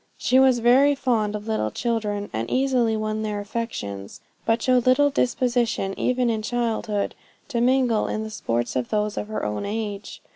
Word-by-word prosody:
She 255 - +3
was 265 -2 +5
very 260 +5 +5
fond 220 -6 0
of 210 +1 -6
little 215 - 0
children, 210 - -2
and 110 +1 -3
easily 255 -4 +1
won 215 0 -2
their 210 -1 -2
affections; 200 - -5 0.3
but 225 +1 +3
showed 250 +1 +2
little 285 +3 +4
disposition 240 -6 0
even 250 -1 +1
in 225 -2 0
childhood, 225 -2 -1 0.4
to 235 -4 -1
mingle 250 -3 +2
in 215 - -2
the 220 - -6
sports 120 - -2
of 125 -2 -1
those 210 0 0
of - - -4
her 215 - -3
own 105 0 -2
age. 205 -1 -4
225 Hz, 175 wpm, -24 LUFS, 210-245 Hz, 0.4 s, was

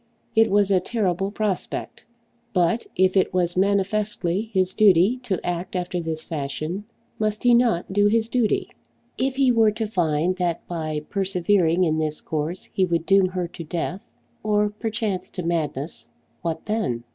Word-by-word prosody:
It 225 0 +5
was 200 0 +3
a 190 - +5
terrible 195 -2 -1
prospect! 205 -2 -3 0.5
But 180 +4 +1
if 185 +1 +3
it 190 -1 +2
was 175 -1 +1
manifestly 200 0 0
his 185 -2 +1
duty 205 +3 +5
to 200 -8 -2
act 175 +2 -3
after 180 0 -2
this 160 -1 -3
fashion, 155 +6 -4 0.3
must 215 0 -1
he 245 -1 +5
not 230 -7 +2
do 205 +1 +4
his 220 +1 +2
duty? 235 -2 0 0.5
If 265 0 0
he 265 -2 +4
were 225 -2 +5
to 220 +1 -2
find 175 -3 0
that 175 -2 -2
by 155 -3 -3
persevering 185 -2 +2
in 160 -2 +1
this 155 -1 -1
course 155 +3 -3
he 190 - +2
would 170 -2 0
doom 195 0 +5
her 180 -1 -3
to 170 - -8
death, 175 +4 -4 0.3
or 210 -1 +1
perchance 210 -3 -3
to 180 - -6
madness, 160 -3 -2 0.3
what 165 -2 -3
then? 210 - -1
185 Hz, 160 wpm, -24 LUFS, 170-210 Hz, 0.5 s, It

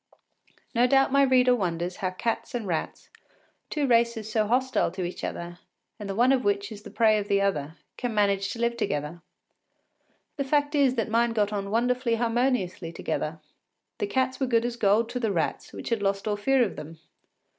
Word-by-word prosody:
No 245 0 +4
doubt 270 +1 +3
my 280 +1 +4
reader 255 -2 +5
wonders 175 -3 -2
how 190 -3 -1
cats 225 +6 -3
and 235 -3 -3
rats, 170 -4 -4 0.6
two 295 -2 0
races 235 -3 +1
so 215 -1 +1
hostile 255 +3 +1
to 185 +2 -5
each 175 +1 -5
other, 175 +1 -5 0.4
and 205 -1 -6
the 195 - -3
one 245 +4 +4
of 265 -2 +2
which 205 0 0
is 210 -1 -8
the - - -10
prey 220 -2 +3
of 205 - -5
the 200 -1 +2
other, 160 -6 -1 0.2
can 245 -1 -2
manage 200 -2 +1
to 230 - -6
live 235 0 0
together. 160 -5 -3 1.2
The 280 - 0
fact 290 +2 +1
is 275 -3 +3
that 225 -3 0
mine 230 +1 +2
got 210 -2 0
on 200 -1 -3
wonderfully 240 +2 +1
harmoniously 230 -7 0
together. 160 -1 -4 0.6
The 415 - -1
cats 260 -6 0
were 265 - 0
good 235 -1 +2
as 240 -1 -2
gold 220 0 +2
to 250 - -3
the 225 -4 0
rats, 165 -5 -2
which - - -7
had 230 -3 0
lost 195 +1 -1
all 210 - +1
fear 260 +5 +2
of 215 - -3
them. 160 +2 -9
225 Hz, 200 wpm, -26 LUFS, 195-250 Hz, 1.2 s, reader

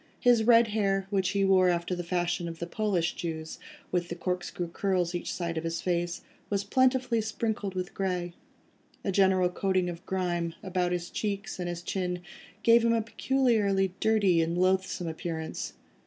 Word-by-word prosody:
His 240 -3 +4
red 230 -1 +6
hair, 195 -2 +1
which 190 -2 +1
he 195 0 +1
wore 185 -1 +5
after 170 +1 0
the 175 - -4
fashion 175 0 -1
of 165 -1 -6
the 170 - -4
Polish 180 -3 0
Jews, 160 -2 -5 0.3
with 175 -1 0
the 170 - -3
corkscrew 180 -1 -3
curls 185 -2 0
each 175 - -3
side 170 -2 -2
of - - -8
his 165 0 -2
face, 175 0 -1 0.3
was 200 -1 0
plentifully 255 +1 +2
sprinkled 215 -2 -2
with 185 0 -3
grey—a 180 +1 -5
general 190 -1 +4
coating 185 -1 0
of 170 +1 -10
grime, 175 -3 -1
about 180 -2 0
his 175 0 -3
cheeks 200 -2 -3
and 175 -1 -2
his 175 0 -5
chin, 180 -1 -2 0.4
gave 230 0 +6
him 230 0 +3
a 225 -1 +1
peculiarly 215 -6 +1
dirty 205 -6 +3
and 165 +1 -1
loathsome 185 0 +1
appearance. 160 -1 -4
185 Hz, 170 wpm, -29 LUFS, 175-200 Hz, 0.4 s, red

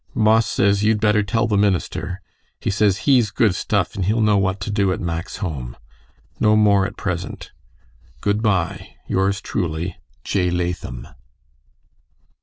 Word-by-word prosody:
Boss 110 +1 +4
says 100 +1 +2
you'd 110 0 +3
better 105 0 +3
tell 115 +3 0
the 110 -3 0
minister. 95 -1 -1 0.4
He - - -1
says 100 0 +1
he's 125 -6 +4
good 105 -1 +2
stuff - - -1
and 95 - -3
he'll 110 +4 +1
know 105 -1 +3
what 95 0 0
to 105 - -3
do 100 -2 +1
at 100 - -2
Mack's 85 0 -4
home. 65 - -5 0.6
No 110 0 +4
more 100 -2 +4
at - - -11
present. 90 -2 -4 0.7
Good 105 +1 0
bye. 95 -7 -1
Yours 100 +1 0
truely, 85 -2 -3 0.3
J. 90 -3 0
LATHAM. 85 -8 -3
100 Hz, 150 wpm, -21 LUFS, 90-105 Hz, 0.7 s, Boss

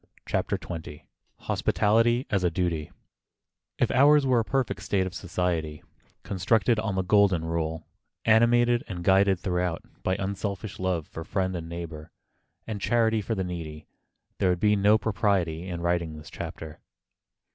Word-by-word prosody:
CHAPTER - - -1
XX 80 -3 -8 0.4
HOSPITALITY 115 +4 +2
AS 95 -3 +1
A 90 - +3
DUTY 85 -3 -2 0.9
IF - - +1
ours 145 +2 +5
were 130 -2 +3
a - - +1
perfect 130 0 -1
state 95 -2 0
of 95 - -5
society, 85 -5 -2 0.4
constructed 110 +4 +1
on 105 -3 -2
the 95 - 0
Golden 95 -4 +3
Rule, 80 -1 -2 0.4
animated 120 +2 +4
and 90 -3 -6
guided 95 0 +4
throughout 90 -2 -1 0.2
by 95 - 0
unselfish 100 +1 -4
love 90 -4 -1
for 80 - -8
friend 95 +1 -1
and 85 -1 -6
neighbor, 85 -2 -7 0.5
and 105 -3 -5
charity 115 -2 +2
for 110 +3 -2
the 95 - -1
needy, 80 -4 -6 0.5
there 95 - +3
would 90 -1 +1
be 105 +1 +3
no 105 +2 +4
propriety 95 -6 0
in 85 -2 -4
writing 85 -2 -1
this 75 +1 -11
chapter. 80 -1 -7
95 Hz, 150 wpm, -27 LUFS, 85-110 Hz, 0.9 s, ours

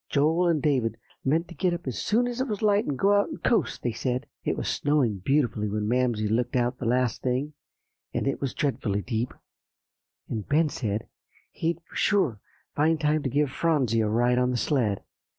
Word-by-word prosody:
Joel 160 +5 +3
and 160 -4 +1
David 130 -7 +1 0.3
meant 160 +5 +1
to - - -8
get 180 -1 0
up 170 - -8
as 130 -3 -3
soon 240 +3 +2
as 245 +1 -3
it 260 - 0
was 210 -2 -3
light 205 0 +3
and 140 - -1
go 200 +6 +4
out 205 0 +3
and 310 - -8
coast, 235 - +1
they 120 - 0
said. 125 +2 -2 0.2
It - - -1
was - - -3
snowing 140 -9 +1
beautifully 110 -2 +1
when 105 0 -2
Mamsie 120 -3 +1
looked 115 +4 0
out 125 0 +1
the 120 - -2
last 125 0 +1
thing, 130 +4 -1 0.6
and - - -1
it 135 - -1
was 135 -3 -2
dreadfully 105 -8 -1
deep, 120 0 -2 1.0
and 110 -3 -5
Ben 155 +2 +3
said 110 -5 -3 0.4
he'd 165 +1 -1
be 170 - -28
sure 200 - +2
to 105 - -17 0.3
find 155 +2 +2
time 155 0 +2
to 135 - -2
give 145 +1 +1
Phronsie 135 -8 +1
a 110 - +1
ride 120 +3 +2
on 125 0 +2
the 125 - 0
sled. 120 -7 0
135 Hz, 205 wpm, -26 LUFS, 120-160 Hz, 1.0 s, go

